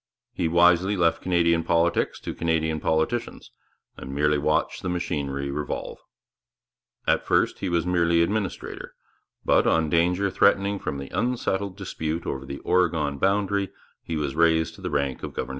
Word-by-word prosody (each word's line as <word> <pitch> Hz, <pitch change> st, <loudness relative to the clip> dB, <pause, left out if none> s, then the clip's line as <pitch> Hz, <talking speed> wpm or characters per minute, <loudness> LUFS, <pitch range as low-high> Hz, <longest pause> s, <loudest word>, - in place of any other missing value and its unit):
He 90 Hz, -9 st, -1 dB
wisely 90 Hz, +4 st, +4 dB
left 85 Hz, -2 st, +2 dB
Canadian 85 Hz, -2 st, +2 dB
politics 85 Hz, +1 st, +1 dB
to -, -, -5 dB
Canadian 80 Hz, -1 st, 0 dB
politicians, 80 Hz, +11 st, -1 dB, 0.5 s
and 65 Hz, +1 st, -7 dB
merely 75 Hz, 0 st, +2 dB
watched 75 Hz, +2 st, 0 dB
the 90 Hz, -, -3 dB
machinery 70 Hz, -5 st, -2 dB
revolve. 75 Hz, +1 st, -4 dB, 1.1 s
At -, -, +2 dB
first -, -, +1 dB
he 95 Hz, -, -2 dB
was 85 Hz, -1 st, 0 dB
merely 85 Hz, -2 st, +3 dB
administrator, 100 Hz, 0 st, -4 dB, 0.5 s
but, -, -, +3 dB
on 80 Hz, -2 st, +2 dB
danger 90 Hz, +4 st, +2 dB
threatening 100 Hz, +1 st, +2 dB
from 70 Hz, -, -4 dB
the 70 Hz, 0 st, -7 dB
unsettled 100 Hz, -4 st, -1 dB
dispute 85 Hz, -4 st, -4 dB
over 65 Hz, 0 st, -4 dB
the 70 Hz, -, -5 dB
Oregon 80 Hz, -6 st, +1 dB
boundary, 100 Hz, +1 st, +1 dB, 0.3 s
he 85 Hz, -, -5 dB
was 70 Hz, -3 st, -2 dB
raised 80 Hz, 0 st, +2 dB
to -, -, -14 dB
the -, -, -3 dB
rank 70 Hz, -2 st, -1 dB
of -, -, -6 dB
governor -, -, -1 dB
general. -, -, -11 dB
85 Hz, 160 wpm, -25 LUFS, 75-95 Hz, 1.1 s, wisely